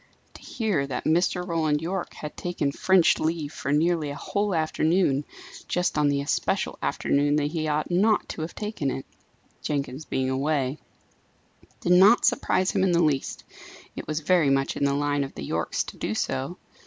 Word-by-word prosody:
To -, -, -13 dB
hear 195 Hz, -, -1 dB
that 130 Hz, -2 st, -4 dB
Mr. 180 Hz, +2 st, +1 dB
Roland 160 Hz, -3 st, +1 dB
Yorke 175 Hz, +4 st, -4 dB
had 150 Hz, -, -7 dB
taken 175 Hz, -5 st, -2 dB
French 185 Hz, +3 st, +3 dB
leave 155 Hz, -2 st, -2 dB
for 140 Hz, -, -3 dB
nearly 160 Hz, 0 st, +2 dB
a 140 Hz, -, -5 dB
whole 200 Hz, +6 st, -1 dB
afternoon, 155 Hz, -2 st, +1 dB, 0.4 s
just 180 Hz, 0 st, 0 dB
on 150 Hz, -1 st, +3 dB
the 140 Hz, 0 st, +1 dB
especial 140 Hz, -, -1 dB
afternoon 145 Hz, +1 st, +1 dB
that 150 Hz, 0 st, 0 dB
he 155 Hz, -2 st, -2 dB
ought 150 Hz, +2 st, -1 dB
not 205 Hz, +5 st, +3 dB
to -, -, -5 dB
have 160 Hz, +2 st, -5 dB
taken 210 Hz, -10 st, -3 dB
it 135 Hz, -, -4 dB, 0.6 s
Jenkins 140 Hz, 0 st, -3 dB
being 130 Hz, 0 st, -1 dB
away 140 Hz, 0 st, 0 dB, 1.0 s
did 175 Hz, -, 0 dB
not 195 Hz, +6 st, +6 dB
surprise 185 Hz, 0 st, +2 dB
him -, -, 0 dB
in 185 Hz, -2 st, +2 dB
the 170 Hz, 0 st, +4 dB
least; 145 Hz, -4 st, -1 dB, 0.5 s
it -, -, -7 dB
was 155 Hz, 0 st, -2 dB
very 165 Hz, -2 st, +3 dB
much 135 Hz, 0 st, +1 dB
in 140 Hz, -, 0 dB
the 140 Hz, 0 st, +1 dB
line 145 Hz, 0 st, 0 dB
of 135 Hz, -, -8 dB
the -, -, -6 dB
Yorkes -, -, -1 dB
to -, -, -10 dB
do 105 Hz, -, -3 dB
so. 135 Hz, +10 st, -2 dB
155 Hz, 180 wpm, -25 LUFS, 140-175 Hz, 1.0 s, not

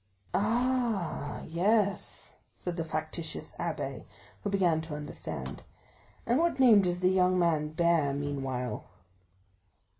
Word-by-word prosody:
"Ah, 225 Hz, -, 0 dB
yes," 200 Hz, +4 st, 0 dB, 0.2 s
said 180 Hz, -1 st, -3 dB
the 165 Hz, -, -1 dB
factitious 160 Hz, +1 st, -4 dB
abbé, -, -, -3 dB, 0.4 s
who 205 Hz, -, -2 dB
began 180 Hz, -5 st, +2 dB
to 160 Hz, -2 st, -6 dB
understand; 150 Hz, 0 st, -6 dB, 0.6 s
"and 240 Hz, +4 st, +3 dB
what 335 Hz, -4 st, +1 dB
name 235 Hz, -6 st, +8 dB
does 180 Hz, -1 st, -1 dB
the 185 Hz, 0 st, +4 dB
young 185 Hz, -1 st, +3 dB
man 165 Hz, -4 st, +2 dB
bear 165 Hz, -2 st, +2 dB
meanwhile?" 135 Hz, -3 st, -3 dB
175 Hz, 115 wpm, -30 LUFS, 155-205 Hz, 0.6 s, name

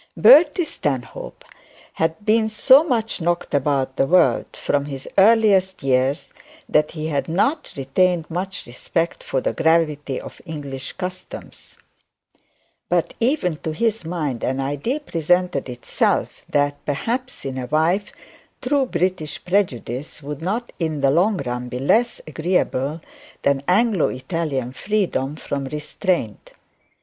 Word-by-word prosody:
Bertie 295 Hz, +9 st, +7 dB
Stanhope 135 Hz, -, -4 dB, 0.5 s
had 160 Hz, 0 st, 0 dB, 0.3 s
so 260 Hz, +7 st, +6 dB
much 225 Hz, -, -1 dB
knocked 175 Hz, 0 st, -1 dB
about 135 Hz, -2 st, 0 dB
the 135 Hz, -, +2 dB
world 180 Hz, +3 st, +4 dB
from 140 Hz, -1 st, 0 dB
his 135 Hz, -2 st, -7 dB
earliest 195 Hz, -4 st, +4 dB
years, 135 Hz, +1 st, +1 dB, 0.3 s
that 150 Hz, 0 st, +2 dB
he 155 Hz, -2 st, -4 dB
had 145 Hz, +1 st, -1 dB
not 270 Hz, -, 0 dB
retained 170 Hz, +5 st, +1 dB
much 185 Hz, +3 st, -4 dB
respect 165 Hz, +7 st, -3 dB
for 130 Hz, -, -1 dB
the -, -, -1 dB
gravity 155 Hz, -4 st, +1 dB
of -, -, -11 dB
English 145 Hz, -5 st, -6 dB
customs; 185 Hz, -1 st, -8 dB, 1.1 s
but -, -, +1 dB
even 230 Hz, -, +1 dB
to 155 Hz, 0 st, -4 dB
his 225 Hz, +3 st, 0 dB
mind 155 Hz, -8 st, -3 dB
an 130 Hz, +1 st, -1 dB
idea 145 Hz, -, -2 dB
presented 175 Hz, -, 0 dB
itself, 120 Hz, -1 st, -1 dB
that, 145 Hz, 0 st, 0 dB
perhaps 240 Hz, -, -3 dB
in 130 Hz, -1 st, -3 dB
a 125 Hz, -, -4 dB
wife, 165 Hz, +8 st, +1 dB, 0.5 s
true 270 Hz, 0 st, +1 dB
British 180 Hz, -, -2 dB
prejudice 150 Hz, -, -1 dB
would 145 Hz, +1 st, -6 dB
not 220 Hz, +8 st, -2 dB
in 160 Hz, -4 st, -2 dB
the 135 Hz, -1 st, +4 dB
long 185 Hz, +7 st, +3 dB
run 125 Hz, 0 st, -3 dB
be 125 Hz, -, -4 dB
less 225 Hz, -, +2 dB
agreeable 155 Hz, -2 st, -1 dB, 0.4 s
than 140 Hz, -1 st, +2 dB
Anglo 205 Hz, -1 st, +3 dB
Italian 135 Hz, -2 st, -3 dB
freedom 175 Hz, -4 st, -1 dB
from 140 Hz, -2 st, -4 dB
restraint. 150 Hz, -, -3 dB
160 Hz, 130 wpm, -21 LUFS, 140-190 Hz, 1.1 s, Bertie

